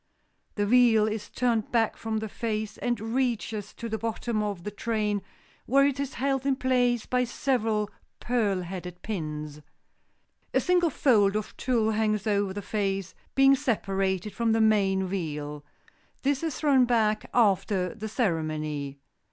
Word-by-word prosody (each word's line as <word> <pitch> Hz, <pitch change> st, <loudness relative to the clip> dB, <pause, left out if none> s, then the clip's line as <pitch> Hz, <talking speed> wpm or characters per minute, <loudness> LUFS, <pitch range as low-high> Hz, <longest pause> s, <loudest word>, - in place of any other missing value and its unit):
The 205 Hz, -, +1 dB
veil 225 Hz, -1 st, +5 dB
is 215 Hz, -1 st, -4 dB
turned 235 Hz, -3 st, 0 dB
back 225 Hz, -2 st, +2 dB
from 220 Hz, -1 st, -3 dB
the 220 Hz, 0 st, -3 dB
face 215 Hz, 0 st, -3 dB
and 240 Hz, -2 st, -1 dB
reaches 225 Hz, -5 st, -1 dB
to 235 Hz, -, -6 dB
the 220 Hz, -1 st, -3 dB
bottom 225 Hz, 0 st, -2 dB
of 200 Hz, -4 st, -3 dB
the 210 Hz, -, -4 dB
train 210 Hz, -1 st, -1 dB, 0.5 s
where 275 Hz, +2 st, +5 dB
it 280 Hz, -1 st, 0 dB
is 280 Hz, -1 st, -3 dB
held 270 Hz, +1 st, 0 dB
in 275 Hz, -1 st, +2 dB
place 250 Hz, -3 st, +1 dB
by 250 Hz, 0 st, +1 dB
several 225 Hz, -4 st, 0 dB, 0.3 s
pearl 215 Hz, -6 st, 0 dB
headed 180 Hz, 0 st, -7 dB
pins. 150 Hz, -7 st, -5 dB, 0.9 s
A -, -, +6 dB
single 355 Hz, -2 st, +3 dB
fold 210 Hz, -8 st, +3 dB
of 215 Hz, -1 st, -3 dB
tulle 230 Hz, -4 st, +1 dB
hangs 215 Hz, -1 st, 0 dB
over 205 Hz, -2 st, +1 dB
the 205 Hz, +1 st, -5 dB
face, 195 Hz, -2 st, -2 dB, 0.2 s
being 270 Hz, 0 st, +6 dB
separated 195 Hz, -5 st, -1 dB
from 230 Hz, -1 st, +1 dB
the 225 Hz, -, +2 dB
main 200 Hz, -3 st, +3 dB
veil. 150 Hz, -6 st, -4 dB, 0.6 s
This 275 Hz, 0 st, +1 dB
is 325 Hz, -4 st, -2 dB
thrown 275 Hz, -4 st, +4 dB
back 220 Hz, -3 st, +1 dB
after 195 Hz, -4 st, +2 dB
the 220 Hz, -1 st, -6 dB
ceremony. 155 Hz, -, -2 dB
215 Hz, 150 wpm, -27 LUFS, 195-245 Hz, 0.9 s, A